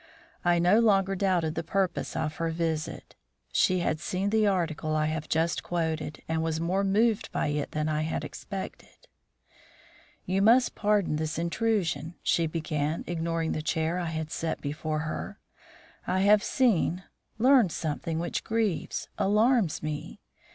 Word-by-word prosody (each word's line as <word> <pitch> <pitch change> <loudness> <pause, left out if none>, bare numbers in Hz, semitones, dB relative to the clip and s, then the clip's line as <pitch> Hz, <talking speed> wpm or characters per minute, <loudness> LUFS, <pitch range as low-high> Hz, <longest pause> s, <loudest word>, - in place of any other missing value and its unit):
I 175 0 +3
no 180 +6 +4
longer 195 -4 +3
doubted 180 -5 +1
the - - -3
purpose 190 +2 -1
of 155 -1 -2
her 165 -1 -1
visit. 160 -1 -3 0.4
She 185 -1 +3
had 155 -2 0
seen 190 +5 -2
the 215 -1 +3
article 165 -5 0
I 155 0 +2
have 155 0 -3
just 165 +1 +1
quoted, 160 -3 -3
and 160 0 0
was 160 -1 -1
more 180 +4 0
moved 215 +2 +2
by - - 0
it 145 -1 -2
than 155 0 -1
I 155 0 0
had 155 +1 -2
expected. 195 -1 -8 1.2
"You 190 +2 +1
must 235 +4 +5
pardon 205 -7 +1
this 155 0 -2
intrusion," 170 -3 -1
she 165 -1 +2
began, 155 -1 -2
ignoring 165 -1 -1
the 155 - -2
chair 160 +2 0
I 175 - -2
had 160 -1 -4
set 165 -1 -3
for 155 0 -2
her. 155 0 -5 0.7
"I 185 +1 +1
have 205 +1 +5
seen 185 -8 +2 0.3
learned 245 -5 +5
something 160 +1 -3
which 170 +1 -2
grieves 220 -6 -1
alarms 215 - +2
me. 155 +6 -5
170 Hz, 150 wpm, -28 LUFS, 160-195 Hz, 1.2 s, must